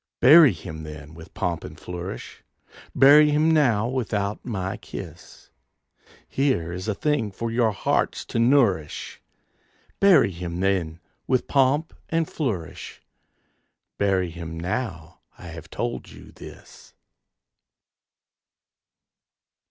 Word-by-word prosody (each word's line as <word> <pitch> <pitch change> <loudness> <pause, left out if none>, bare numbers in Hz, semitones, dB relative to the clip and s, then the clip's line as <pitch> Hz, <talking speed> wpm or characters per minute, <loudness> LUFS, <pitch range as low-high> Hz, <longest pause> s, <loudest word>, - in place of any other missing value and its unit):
Bury 150 +2 +8
him 80 -1 -8
then 75 -1 -10
with 80 +2 -14
pomp 85 -2 -2
and - - -10
flourish! 90 +2 -8 0.5
Bury 150 +2 +7
him 155 +2 +3
now 120 -9 +3
without 105 -5 -2
my 95 -5 -3
kiss! - - -11 0.8
Here 130 - 0
is 90 +3 -6
a 110 - -1
thing 145 -4 0
for 115 +4 -4
your 115 -1 +2
hearts 95 - -1
to - - -3
nourish, 115 - +1 0.8
Bury 195 - +5
him 85 0 -6
then 90 -4 -1 0.3
with 130 -1 +1
pomp 140 +3 +2 0.2
and 165 -1 0
flourish! 105 - -5 1.0
Bury 95 -3 +1
him 80 -1 -7
now 90 -2 -4 0.2
I 90 - -10
have 80 0 -10
told 120 0 -4
you - - -14
this. - - -14
100 Hz, 115 wpm, -24 LUFS, 85-130 Hz, 1.0 s, Bury